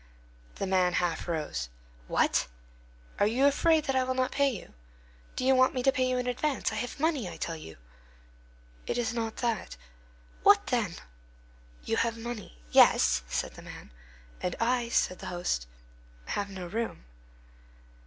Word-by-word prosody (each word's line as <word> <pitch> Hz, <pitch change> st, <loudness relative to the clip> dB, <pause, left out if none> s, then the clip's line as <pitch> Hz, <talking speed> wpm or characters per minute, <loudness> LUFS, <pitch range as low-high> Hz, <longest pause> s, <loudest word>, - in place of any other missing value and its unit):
The -, -, -2 dB
man 185 Hz, -2 st, +2 dB
half 175 Hz, -2 st, 0 dB
rose. 150 Hz, -, -2 dB, 0.4 s
"What! -, -, +2 dB, 0.7 s
Are 205 Hz, -, +4 dB
you 250 Hz, +6 st, +2 dB
afraid 315 Hz, +2 st, +4 dB
that 270 Hz, -2 st, -1 dB
I 260 Hz, -, +3 dB
will 260 Hz, 0 st, -1 dB
not 255 Hz, 0 st, +1 dB
pay 280 Hz, 0 st, +3 dB
you? 225 Hz, -, -7 dB, 0.6 s
Do 255 Hz, -, -2 dB
you 265 Hz, -, +6 dB
want 255 Hz, 0 st, +4 dB
me 250 Hz, -, -1 dB
to 270 Hz, -, +5 dB
pay 255 Hz, -2 st, +1 dB
you 255 Hz, -, +1 dB
in 250 Hz, -, -1 dB
advance? 260 Hz, +2 st, 0 dB
I -, -, -4 dB
have 245 Hz, +5 st, -4 dB
money, 290 Hz, -, +1 dB
I -, -, -9 dB
tell 165 Hz, -, -3 dB
you." 80 Hz, -, -10 dB, 1.1 s
"It -, -, -1 dB
is 235 Hz, -2 st, 0 dB
not 225 Hz, -2 st, -2 dB
that." 230 Hz, -, -2 dB, 0.6 s
"What -, -, +6 dB
then?" -, -, 0 dB, 0.9 s
"You -, -, -1 dB
have 230 Hz, 0 st, +1 dB
money—" 225 Hz, -, -7 dB
"Yes," -, -, +6 dB
said -, -, -2 dB
the -, -, -11 dB
man. -, -, -11 dB, 0.5 s
"And 180 Hz, -, -1 dB
I," 240 Hz, 0 st, +1 dB
said 185 Hz, -5 st, +1 dB
the 190 Hz, -, -7 dB
host, 175 Hz, -, -2 dB, 0.6 s
"have 200 Hz, 0 st, -2 dB
no 190 Hz, -2 st, -6 dB
room." 220 Hz, -, -4 dB
230 Hz, 165 wpm, -29 LUFS, 180-255 Hz, 1.1 s, you